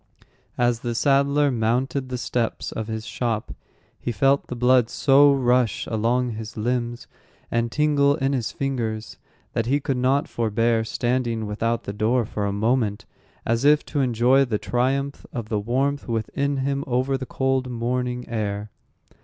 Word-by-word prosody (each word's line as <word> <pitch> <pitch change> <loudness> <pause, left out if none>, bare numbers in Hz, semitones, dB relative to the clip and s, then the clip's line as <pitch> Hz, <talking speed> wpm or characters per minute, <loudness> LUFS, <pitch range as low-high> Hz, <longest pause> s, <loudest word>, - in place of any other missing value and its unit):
As 120 -1 +2
the 120 -1 -3
saddler 140 +2 +3
mounted 125 +3 0
the 125 - -3
steps 120 -1 -2
of 110 -1 -4
his 110 -1 -4
shop, 115 -3 -2 0.5
he 120 - -3
felt 135 +5 +2
the 125 - -5
blood 125 -1 +3
so 140 +2 +5
rush 125 -4 +2
along 120 +3 0
his 110 +1 -7
limbs, 120 +1 -2 0.5
and 115 0 0
tingle 145 -1 +3
in 135 -2 0
his 120 -5 -1
fingers, 115 -5 -3 0.4
that 115 - -1
he 140 +3 +2
could 135 -2 -2
not 130 +3 +2
forbear 115 0 +1
standing 120 -1 -1
without 115 +3 -1
the 100 - -5
door 115 +3 +1
for 105 -1 -3
a - - -1
moment, 110 0 0 0.4
as 115 +2 0
if 150 +1 +4
to 145 - -3
enjoy 125 +2 +3
the 120 -5 -1
triumph 135 +5 -1
of 115 -4 -5
the 105 -2 0
warmth 135 +6 -1
within 140 +5 -1
him 140 0 -1
over 130 +2 +1
the 130 -1 -4
cold 130 0 0
morning 125 +1 -2
air. 105 -2 -3
125 Hz, 160 wpm, -23 LUFS, 115-135 Hz, 0.5 s, so